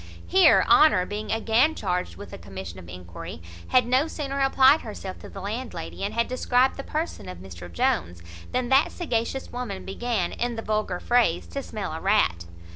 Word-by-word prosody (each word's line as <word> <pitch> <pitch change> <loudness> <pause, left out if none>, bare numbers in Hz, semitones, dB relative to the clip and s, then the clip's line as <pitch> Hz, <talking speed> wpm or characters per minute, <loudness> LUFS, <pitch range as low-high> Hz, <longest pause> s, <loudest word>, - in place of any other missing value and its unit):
Here 375 0 +5
Honour, 300 -13 +6
being 210 +2 -5
again 225 +7 +2
charged 180 0 -2
with 205 - -10
a - - -6
commission 95 -2 -8
of 85 -2 -12
enquiry, 90 -3 -9 0.3
had 250 -2 +4
no 255 +5 +2
sooner 280 -3 -4
applied 270 +2 +5
herself 200 -4 -7
to - - -11
the 195 - -9
landlady, 220 +1 -5
and 200 - -3
had 235 0 +1
described 255 +1 +2
the 275 - -6
person 300 - -4
of 90 - -7
Mr 90 -1 -10
Jones, 85 0 -1 0.3
than 250 -1 -1
that 270 +3 +4
sagacious 265 -5 -2
woman 240 -6 -5
began, 195 -2 -2
in 240 0 -2
the 225 - -5
vulgar 215 -4 -1
phrase, 235 - +2
to - - -4
smell - - -5
a - - -5
rat. 85 0 +2
220 Hz, 185 wpm, -25 LUFS, -, 0.3 s, Honour